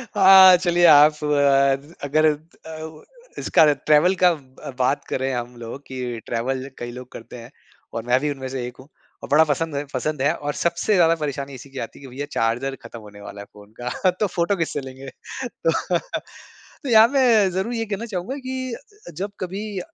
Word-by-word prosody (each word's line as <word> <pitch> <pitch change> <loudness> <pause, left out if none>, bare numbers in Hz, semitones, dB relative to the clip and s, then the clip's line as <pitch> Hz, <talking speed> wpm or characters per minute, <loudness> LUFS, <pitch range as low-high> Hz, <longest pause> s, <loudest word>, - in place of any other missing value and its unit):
हाँ, 190 -2 +8
चलिए 175 -1 +2
आप 150 -1 +7
अ, 140 +1 +2
अगर 155 +3 +2
अ, 160 0 -11 0.4
इसका - - +3
रहे 150 -2 +4
ट्रैवल 155 +5 +4
का 180 - +8
अ, 140 -5 -7
बात 130 +3 +1
करे 130 +1 -1
हम 120 0 -5
लोग 120 +4 -8
कि 125 -3 -5
ट्रैवल 130 +3 -3
कई 120 0 -6
लोग 125 +1 -10
करते 115 +2 -11
हैं 120 +2 -12 0.4
और 115 - -4
मैं 125 +1 +3
भी 150 +2 -1
उनमें 135 -2 -6
से 130 -2 -4
एक 125 - -11
हूँ 130 - -14 0.4
और - - -8
बड़ा 155 +2 +6
पसंद 155 +2 -1
है 145 +1 -3
पसंद 140 +2 -2
है 145 +3 +2
और 145 0 -4
सबसे 170 +7 0
ज़्यादा 165 -2 +4
परेशानी 140 -2 -4
इसी 130 +2 -12
की 135 0 -8
आती 115 - -7
है - - -15
कि - - -9
भैया 145 +2 -4
चार्जर 120 +4 -1
ख़त्म 115 - -10
होने 105 -1 -14
वाला 100 0 -9
है - - -10
फ़ोन 105 0 -16
का, 125 +9 0
तो 205 +4 -1
फ़ोटो 175 +2 0
किससे 160 -4 -2
लेंगे? 130 0 -10 0.4
तो, 230 -9 -2 1.1
तो 275 - -4
यहाँ 220 -1 +7
मैं 235 -7 +3
ज़रूर 190 +6 -2
ये 225 -1 -2
कहना 210 +2 -4
चाहूँगा 210 +4 -5
कि 260 -2 -5
अ, 350 - -13
जब 200 +3 -4
कभी 195 +2 -5
150 Hz, 200 wpm, -22 LUFS, 130-185 Hz, 1.1 s, हाँ